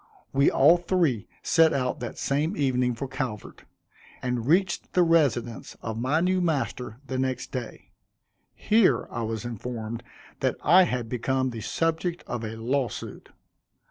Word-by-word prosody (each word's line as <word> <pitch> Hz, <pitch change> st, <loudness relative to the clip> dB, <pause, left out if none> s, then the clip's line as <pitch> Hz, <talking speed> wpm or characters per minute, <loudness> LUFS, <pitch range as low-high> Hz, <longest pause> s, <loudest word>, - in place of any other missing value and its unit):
We 140 Hz, +1 st, +4 dB
all 150 Hz, +6 st, +6 dB
three 170 Hz, -, 0 dB, 0.2 s
set 165 Hz, -2 st, +4 dB
out 125 Hz, -2 st, -1 dB
that 120 Hz, -2 st, -6 dB
same 145 Hz, +4 st, 0 dB
evening 125 Hz, -3 st, +1 dB
for 135 Hz, +4 st, -4 dB
Calvert, 125 Hz, -5 st, -5 dB, 0.6 s
and 125 Hz, -2 st, -2 dB
reached 175 Hz, +3 st, +1 dB
the 180 Hz, -, +5 dB
residence 140 Hz, -9 st, +1 dB
of 110 Hz, 0 st, -4 dB
my 145 Hz, +6 st, +2 dB
new 185 Hz, +1 st, +2 dB
master 135 Hz, -8 st, -2 dB
the 130 Hz, -1 st, -3 dB
next 130 Hz, -1 st, -2 dB
day. 125 Hz, -4 st, -7 dB, 0.6 s
Here, 200 Hz, -, +3 dB
I 120 Hz, -, -3 dB
was 115 Hz, 0 st, -3 dB
informed, 115 Hz, 0 st, -5 dB, 0.4 s
that -, -, +1 dB
I 180 Hz, +5 st, +7 dB
had 125 Hz, -7 st, -2 dB
become 130 Hz, +2 st, -1 dB
the 115 Hz, -2 st, -6 dB
subject 165 Hz, -, -1 dB
of 120 Hz, -1 st, -4 dB
a 110 Hz, 0 st, -5 dB
law 125 Hz, +4 st, 0 dB
suit. -, -, -8 dB
130 Hz, 150 wpm, -26 LUFS, 120-160 Hz, 0.6 s, I